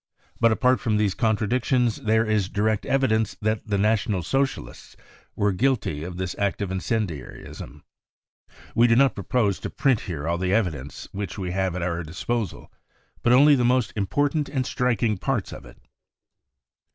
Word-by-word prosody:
But 115 Hz, -1 st, +4 dB
apart 125 Hz, +3 st, +3 dB
from 110 Hz, -2 st, 0 dB
these 105 Hz, -3 st, +1 dB
contradictions 115 Hz, +2 st, +1 dB
there 110 Hz, +1 st, +1 dB
is 105 Hz, -3 st, 0 dB
direct 105 Hz, +1 st, 0 dB
evidence 110 Hz, -6 st, +1 dB
that 110 Hz, +1 st, -1 dB
the 100 Hz, -1 st, 0 dB
National 105 Hz, -2 st, +1 dB
Socialists 135 Hz, -, -3 dB, 0.4 s
were 105 Hz, 0 st, +1 dB
guilty 105 Hz, -, 0 dB
of 90 Hz, +1 st, -6 dB
this 95 Hz, -1 st, -3 dB
act 100 Hz, -1 st, 0 dB
of 95 Hz, -, -4 dB
incendiarism. 90 Hz, -, -4 dB, 0.9 s
We 120 Hz, +1 st, +5 dB
do 115 Hz, -, +4 dB
not 135 Hz, -1 st, +4 dB
propose 100 Hz, 0 st, 0 dB
to -, -, -5 dB
print 135 Hz, -6 st, +1 dB
here 80 Hz, -4 st, -5 dB
all 85 Hz, +1 st, 0 dB
the 95 Hz, +1 st, 0 dB
evidence 75 Hz, -10 st, -2 dB
which 100 Hz, -2 st, -5 dB
we 90 Hz, -3 st, -3 dB
have 95 Hz, -1 st, -1 dB
at 90 Hz, -, -3 dB
our 85 Hz, -1 st, -1 dB
disposal, 95 Hz, +7 st, -4 dB, 0.5 s
but 120 Hz, -, +2 dB
only 145 Hz, +4 st, +7 dB
the 125 Hz, -3 st, +3 dB
most 125 Hz, -2 st, +2 dB
important 145 Hz, -, 0 dB
and 130 Hz, -3 st, -1 dB
striking 115 Hz, -6 st, 0 dB
parts 125 Hz, -5 st, -2 dB
of -, -, -10 dB
it. -, -, -16 dB
105 Hz, 165 wpm, -24 LUFS, 95-120 Hz, 0.9 s, only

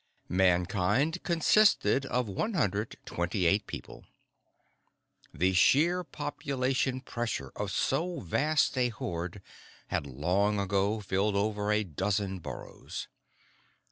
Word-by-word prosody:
I -, -, -10 dB
Mankind 95 Hz, -, +2 dB
consisted 170 Hz, -4 st, +3 dB
of 125 Hz, -2 st, 0 dB
128 100 Hz, -, -1 dB
people. -, -, -8 dB, 1.3 s
The 90 Hz, +3 st, +1 dB
sheer 170 Hz, -, +4 dB
population 135 Hz, -4 st, -2 dB
pressure 115 Hz, -, -4 dB
of -, -, -3 dB
so 175 Hz, +1 st, 0 dB
vast 145 Hz, -, +1 dB
a 125 Hz, -1 st, +3 dB
horde 90 Hz, -3 st, -5 dB, 0.5 s
had 70 Hz, -, -1 dB
long 90 Hz, +10 st, +1 dB
ago 100 Hz, +2 st, 0 dB
filled 100 Hz, +1 st, 0 dB
over 105 Hz, 0 st, 0 dB
a 105 Hz, 0 st, +2 dB
dozen 95 Hz, +2 st, -2 dB
burrows. -, -, -7 dB
105 Hz, 100 wpm, -30 LUFS, 95-135 Hz, 1.3 s, sheer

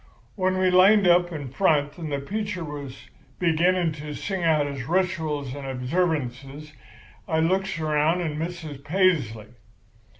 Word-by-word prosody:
"When 185 Hz, -1 st, 0 dB
we 185 Hz, 0 st, +2 dB
lined 190 Hz, +2 st, +6 dB
up 175 Hz, 0 st, +4 dB
in 145 Hz, -5 st, -6 dB
front 145 Hz, -2 st, +1 dB
and 160 Hz, -3 st, -5 dB
the 140 Hz, -, 0 dB
preacher 200 Hz, +5 st, -4 dB
was 145 Hz, -3 st, -8 dB, 0.3 s
beginning 175 Hz, 0 st, +2 dB
to 150 Hz, -1 st, -6 dB
sing 190 Hz, -3 st, -3 dB
out 155 Hz, -3 st, +3 dB
his 140 Hz, -3 st, -5 dB
rituals 160 Hz, -6 st, -1 dB
and 140 Hz, -1 st, -7 dB
observances, 140 Hz, 0 st, -2 dB, 0.5 s
I 160 Hz, -, +1 dB
looks 190 Hz, +3 st, 0 dB
around 155 Hz, +2 st, +1 dB
and 155 Hz, -3 st, -3 dB
misses 160 Hz, -4 st, -5 dB
Paisley. 145 Hz, -, 0 dB
160 Hz, 140 wpm, -25 LUFS, 145-180 Hz, 0.5 s, lined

